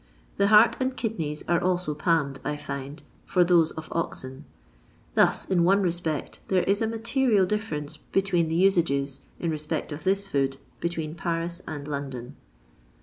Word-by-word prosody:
The 200 - +4
heart 215 +2 +6
and 260 0 -1
kidneys 160 -10 -3
are 170 -1 +2
also 180 -4 0
palmed, 150 -3 +1
I 150 0 -2
find, 140 +1 -6 0.2
for 180 - +3
those 170 -2 +4
of 160 0 -7
oxen 135 -4 -4 0.7
I - - +5
I - - +9
Thus, - - -2
in 180 -3 +2
one 195 +3 +4
respect, 170 -4 -2
there 185 -2 +2
is 200 +2 +1
a 225 - +2
material 230 -2 +2
difference 180 -8 -3
between 190 -4 0
the 160 - -1
usages, 165 -7 +2 0.2
in 170 - -1
respect 155 0 -3
of 145 +1 -6
this 195 +1 +1
food, 135 -6 0 0.2
between 165 -3 -3
Paris 170 +1 -3
and 145 -2 -6
London. 135 -4 -5
170 Hz, 165 wpm, -26 LUFS, 150-195 Hz, 0.7 s, I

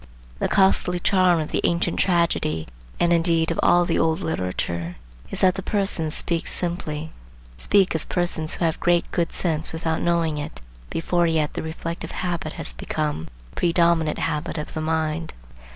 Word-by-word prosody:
The - - +1
costly 190 -2 +3
charm 180 -1 +3
of 155 - -3
the - - 0
ancient 170 +1 0
tragedy, 170 - +1 0.3
and 175 0 +3
indeed 165 -1 +2
of - - -3
all 175 0 +4
the 170 - 0
old 160 +2 +1
literature, 90 - -3 0.3
is - - -2
that 185 -1 +5
the 195 - -5
persons 195 -6 0
speak 170 -1 -1
simply,—speak 155 - -2
as 160 - +1
persons 175 -3 +1
who 170 - 0
have 160 - 0
great 175 0 +2
good 170 -2 0
sense 160 -4 -1
without 160 0 -2
knowing 165 -3 +1
it, 105 - -6 0.3
before 175 +1 +1
yet 160 -2 0
the - - -3
reflective 165 +1 -5 0.2
habit 170 -3 -2
has - - 0
become 150 - -3 0.2
the - - -21
predominant 170 -2 +2
habit 150 +3 -2
of 150 - -5
the 155 - -3
mind. 160 0 -2
165 Hz, 165 wpm, -23 LUFS, 155-175 Hz, 0.3 s, that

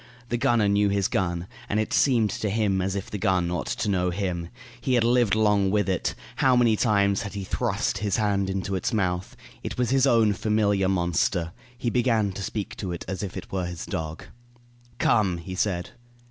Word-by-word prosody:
The 120 - 0
gunner 120 -4 +2
knew 100 0 +3
his 100 -1 +1
gun, 85 -2 -1 0.2
and 105 - +1
it 110 - -2
seemed 115 -6 +3
to 105 - -2
him 100 -2 +1
as 95 +1 -1
if 100 - -5
the 105 - -4
gun 90 -2 +1
ought 90 - -2
to - - -2
know 90 -3 +1
him. 90 -2 -3 0.3
He 130 - +2
had 120 - +3
lived 120 -3 +3
long 105 -3 +3
with 105 +1 +1
it. 95 -2 -1 0.2
How 130 -2 +4
many 120 -3 +4
times 100 -3 +2
he 100 -1 -5
had - - -9
thrust - - -1
his 100 -2 0
hand 100 -3 +1
into 95 0 -2
its 95 +3 -1
mouth! 90 -3 -1 0.3
It - - -5
was 125 -1 0
his 135 0 +4
own 115 -4 +4
familiar 100 -2 +1
monster. 85 -1 0 0.3
He 120 -1 -1
began 115 -5 +2
to 95 - -7
speak 100 +1 -4
to 95 -3 -4
it 85 - -5
as 95 -2 -4
if 100 -3 -5
it - - -8
were 95 -2 -1
his 85 -1 -6
dog. 80 0 -5 0.7
"Come!" 105 -7 +2
he 90 +2 -7
said. 90 -2 -1
100 Hz, 205 wpm, -25 LUFS, 95-110 Hz, 0.7 s, How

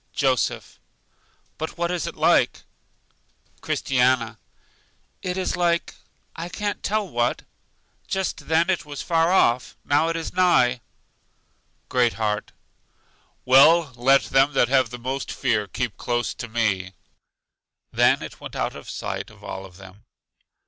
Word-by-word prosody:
Joseph: 130 -3 -1 0.8
But 160 +1 -5
what 170 0 -1
is 175 -4 -2
it - - -6
like? - - +2 1.0
Christiana: 125 -4 +1 0.8
It 180 0 -3
is 185 - -1
like 170 -1 0 0.4
I 170 +1 -6
can't 205 +2 -3
tell 210 0 -1
what. 120 -6 -1 0.6
Just 190 -1 -3
then 165 +3 +3
it 180 - -1
was 145 -1 -7
far 165 0 +2
off, 125 -9 +2
now 145 +3 +2
it 165 - -2
is 165 -1 -4
nigh. 130 -10 +3 1.1
Great 125 -2 +2
heart: 105 -1 -2 0.9
Well, 140 +3 +6
let 135 +3 +4
them 135 +2 +2
that 125 -2 +3
have 130 -3 +3
the 125 - -7
most 130 +3 -4
fear 105 -1 0
keep 120 -1 -4
close 120 -1 -1
to 120 - -7
me. 100 -5 -1 1.0
Then - - +3
it - - -10
went - - -8
out - - -2
of - - -10
sight - - -5
of - - -18
all 95 0 -7
of 90 -1 -18
them. 95 +1 -15
135 Hz, 140 wpm, -23 LUFS, 120-170 Hz, 1.1 s, Well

